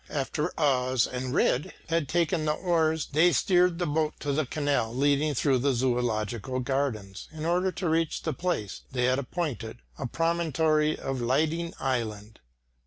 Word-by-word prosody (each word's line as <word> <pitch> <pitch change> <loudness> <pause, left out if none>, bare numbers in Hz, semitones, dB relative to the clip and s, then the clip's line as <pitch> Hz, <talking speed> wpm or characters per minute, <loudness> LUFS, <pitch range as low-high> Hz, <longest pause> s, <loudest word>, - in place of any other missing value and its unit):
After 150 +3 -2
Os 130 -4 +2
and 125 0 -4
Rejd 145 +7 +1 0.2
had 165 -4 0
taken 170 -1 +1
the 150 - +2
oars, 160 -2 0
they 165 +5 +5
steered 180 -1 +3
the 175 - -1
boat 155 0 0
to 145 -1 -1
the 150 -1 0
canal 140 -6 0
leading 145 +2 +2
through 130 0 +2
the 140 +2 +2
Zoological 120 -1 -1
Gardens, 120 -7 -2
in 155 0 -6
order 180 +3 +1
to 180 - -3
reach 165 0 0
the 160 - -1
place 135 - -3
they 125 -1 -1
had 130 +2 +2
appointed, 135 -6 -4 0.2
a 135 - -2
promontory 160 -1 +1
of 135 -2 -3
Liding 160 +7 0
Island. 110 -5 -3
145 Hz, 160 wpm, -27 LUFS, 125-160 Hz, 0.2 s, they